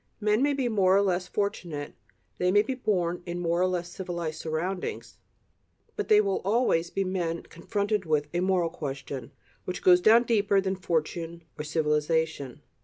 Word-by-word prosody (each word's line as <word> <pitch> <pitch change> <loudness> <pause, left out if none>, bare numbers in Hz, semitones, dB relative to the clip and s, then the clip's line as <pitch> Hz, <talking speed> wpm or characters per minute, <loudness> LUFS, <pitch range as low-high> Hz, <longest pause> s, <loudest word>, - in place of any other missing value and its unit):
Men 210 +1 +2
may 285 +1 +3
be 265 -3 0
more 195 -4 +3
or 200 - +4
less 185 -2 0
fortunate, 170 -8 -3 0.5
they 180 0 +2
may 205 +2 +5
be 265 - -2
born 180 -9 -1
in 175 0 -3
more 170 0 0
or 185 - +4
less 175 -1 -3
civilized 170 -4 -4
surroundings, 175 +4 -4 0.8
but 420 - -3
they 210 - +6
will 200 -2 +1
always 195 -5 +2
be 195 - -1
men 175 -3 -2
confronted 200 +1 -2
by 150 -2 +3
a 175 - +1
"moral 180 -2 +1
question," 135 -4 -6 0.3
which 180 - -5
goes 180 -1 +6
down 225 +4 +6
deeper 205 -4 +2
than 190 0 -1
fortune 170 -1 -2
or 150 - -5
civilization. 150 -2 -1
180 Hz, 170 wpm, -27 LUFS, 165-200 Hz, 0.8 s, they